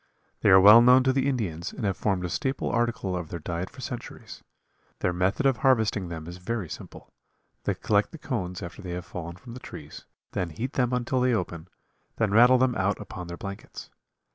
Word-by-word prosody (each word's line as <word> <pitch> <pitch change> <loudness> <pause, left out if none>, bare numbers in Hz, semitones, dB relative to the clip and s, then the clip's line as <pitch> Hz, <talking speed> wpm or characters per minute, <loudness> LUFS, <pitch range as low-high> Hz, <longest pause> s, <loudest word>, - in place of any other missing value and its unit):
They - - +3
are 95 - +9
well 105 +4 +9
known 125 +2 +6
to 130 0 +2
the 135 +1 +1
Indians 95 - -3
and - - -5
have 100 -2 0
formed 95 -3 -1
a - - -3
staple 130 +8 -2
article 115 -5 0
of 85 -3 -4
their 85 - -4
diet 85 +4 -4
for 130 - -13
centuries. 125 -3 -8 0.6
Their 90 - +1
method 95 +10 0
of 135 -2 +3
harvesting 110 - +2
them 80 -2 -6
is 85 +1 -8
very 105 +1 -3
simple. - - -10 0.5
They - - 0
collect - - +1
the - - -9
cones 90 +1 -4
after 90 +3 -8
they 90 -3 -6
have 90 0 -5
fallen 85 -2 -7
from 115 +6 -12
the 125 - -8
trees, - - -10 0.3
then 90 - -2
heat 120 - -5
them 125 -2 +1
until 125 +1 0
they 125 -1 +3
open, 85 -5 -4 0.5
then 110 -3 0
rattle 120 +4 +7
them 130 0 +2
out 100 -1 0
upon 90 -1 -8
their 85 0 -7
blankets. 100 +1 -8
100 Hz, 210 wpm, -26 LUFS, 90-125 Hz, 0.6 s, are